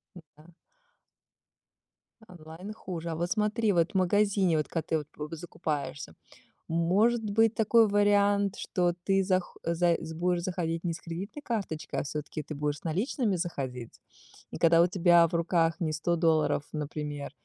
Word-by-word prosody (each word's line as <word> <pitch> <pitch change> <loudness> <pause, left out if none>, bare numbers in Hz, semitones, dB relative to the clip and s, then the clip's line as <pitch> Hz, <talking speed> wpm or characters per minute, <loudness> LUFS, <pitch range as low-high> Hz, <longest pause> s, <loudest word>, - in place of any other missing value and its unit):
Ну 175 - -11
да. 160 +3 -18 1.8
Онлайн 175 +3 -10
хуже. 170 -5 -6
А 160 - -3
вот 175 +2 -2
смотри, 215 0 +1
вот 170 -1 +2
в - - -28
магазине, 190 -2 +2
вот 150 - -1
когда 165 - -2
ты 160 - +1
вот 150 -1 -7
по 150 +2 -6
закупаешься, 150 - -5 0.5
может 195 +8 +2
быть 220 +2 +2
такой 225 +1 +4
вариант, 205 -1 +3
что 175 -1 0
ты 195 0 +3
зах 185 -1 -1
за 170 0 +2
с 160 - -6
будешь 175 +1 0
заходить 170 -2 -2
не 170 - 0
с - - -9
кредитной 190 - -7
карточкой, 200 - -3
а - - -1
всё-таки 150 +2 -5
ты 155 - -7
будешь 145 0 -2
с - - -22
наличными 200 - 0
заходить. 130 -9 -5 0.5
И - - -7
когда 165 0 +5
у - - +5
тебя 175 -2 +5
в 170 - -7
руках 165 -1 +1
не 160 -2 -1
100 155 +3 0
долларов, 160 -3 +2
например, 150 -1 -4
170 Hz, 165 wpm, -29 LUFS, 160-200 Hz, 1.8 s, когда